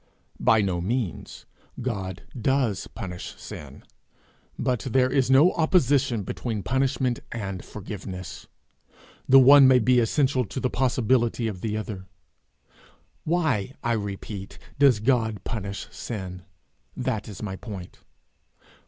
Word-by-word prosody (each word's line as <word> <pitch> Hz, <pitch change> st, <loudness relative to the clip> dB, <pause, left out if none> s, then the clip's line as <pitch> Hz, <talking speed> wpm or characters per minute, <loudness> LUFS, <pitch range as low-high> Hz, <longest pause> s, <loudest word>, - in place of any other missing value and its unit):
'By 110 Hz, -1 st, +4 dB
no 90 Hz, -3 st, -1 dB
means; 110 Hz, -1 st, -3 dB, 0.3 s
God 100 Hz, -7 st, -4 dB
does 125 Hz, -4 st, 0 dB
punish 90 Hz, -5 st, -7 dB
sin, 70 Hz, -1 st, -10 dB, 0.7 s
but 125 Hz, -2 st, 0 dB
there 130 Hz, 0 st, +1 dB
is 130 Hz, -2 st, +2 dB
no 140 Hz, +7 st, +6 dB
opposition 140 Hz, -, +2 dB
between 110 Hz, +1 st, -4 dB
punishment 130 Hz, -1 st, 0 dB
and 100 Hz, -5 st, -5 dB
forgiveness. 95 Hz, -3 st, -8 dB, 0.8 s
The 135 Hz, -, +9 dB
one 135 Hz, +1 st, +9 dB
may 130 Hz, -1 st, +6 dB
be 125 Hz, +1 st, +4 dB
essential 130 Hz, +2 st, +2 dB
to 100 Hz, +4 st, -5 dB
the 125 Hz, -, -1 dB
possibility 120 Hz, -2 st, +1 dB
of 95 Hz, -5 st, -5 dB
the 110 Hz, -1 st, -2 dB
other. 100 Hz, -3 st, -6 dB, 1.2 s
Why, 150 Hz, -, 0 dB
I 120 Hz, -, 0 dB
repeat, 100 Hz, -2 st, -4 dB, 0.2 s
does 135 Hz, -6 st, +5 dB
God 110 Hz, -4 st, +1 dB
punish 100 Hz, -4 st, -5 dB
sin? 95 Hz, -5 st, -6 dB, 0.5 s
That 125 Hz, -4 st, -2 dB
is 105 Hz, -1 st, -8 dB
my 95 Hz, -3 st, -4 dB
point.' 95 Hz, -3 st, -9 dB
115 Hz, 120 wpm, -25 LUFS, 100-130 Hz, 1.2 s, The